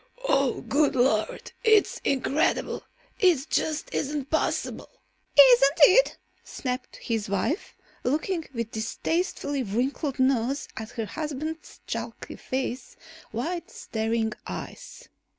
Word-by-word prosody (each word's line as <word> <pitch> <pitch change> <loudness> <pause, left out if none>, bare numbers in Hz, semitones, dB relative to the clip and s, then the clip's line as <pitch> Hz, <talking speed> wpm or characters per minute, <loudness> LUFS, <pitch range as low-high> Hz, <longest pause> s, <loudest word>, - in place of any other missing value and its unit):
"Oh, 275 -2 +2
good 290 0 +2
Lord! 245 -4 +1
It's 440 -3 +4
incredible! 275 +2 +1 0.4
It 330 -7 +3
just 310 -1 -1
isn't 285 -1 -2
possible!" 315 - -1 0.5
"Isn't 275 +2 +8
it?" 385 +12 +7 0.3
snapped 255 -1 -5
his 225 -4 -3
wife, 200 - -1 0.3
looking 315 +5 0
with 230 -3 -4
distastefully 285 +5 -2
wrinkled 255 +6 -1
nose 260 +1 +1
at 220 -1 -6
her 225 -2 -3
husband's 310 +4 -5
chalky - - -5
face, 260 -1 -4 0.4
wide 335 +10 -3
staring 220 0 -2
eyes. - - -8
270 Hz, 105 wpm, -26 LUFS, 235-310 Hz, 0.5 s, Isn't